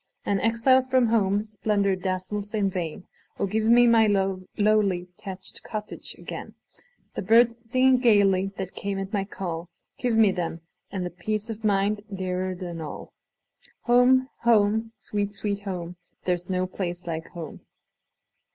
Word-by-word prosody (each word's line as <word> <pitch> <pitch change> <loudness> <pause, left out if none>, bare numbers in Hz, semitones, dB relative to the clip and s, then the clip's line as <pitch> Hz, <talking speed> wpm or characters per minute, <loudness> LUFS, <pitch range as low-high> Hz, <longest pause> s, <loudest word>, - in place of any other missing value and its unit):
An 200 -1 +1
exile 230 +4 +4
from 255 -2 +2
home, 205 -2 +2
splendor 210 -2 0
dazzles 185 +3 -3
in 200 -2 +1
vain:O, 180 +2 -5
give 215 +3 0
me 240 +2 +6
my 230 -2 +5 0.5
lowly 205 -4 +2
thatched 190 -2 -8
cottage 210 -1 -6
again! - - -8 0.6
The - - -3
birds 235 0 +3
singing 255 +1 +4
gayly 195 -5 +4
that 190 -1 -5
came 200 -1 -3
at 195 +1 -5
my 200 -2 0
call;—Give 180 +6 -4
me 215 -3 +6
them,—and 170 +1 -5
the 180 - -4
peace 215 +5 -3
of 220 0 -8
mind 205 0 +2
dearer 185 -1 -2
than 175 -2 -6
all! 150 - -8 0.7
Home! 250 +2 +4
home! 220 -1 +3
sweet, 205 -1 -3
sweet 200 0 -2
home! 180 -2 -5 0.3
There 180 - +3
's 175 +1 -11
no 185 0 0
place 180 -1 -5
like 165 -1 -4
home! 170 -3 -8
200 Hz, 140 wpm, -26 LUFS, 185-225 Hz, 0.7 s, me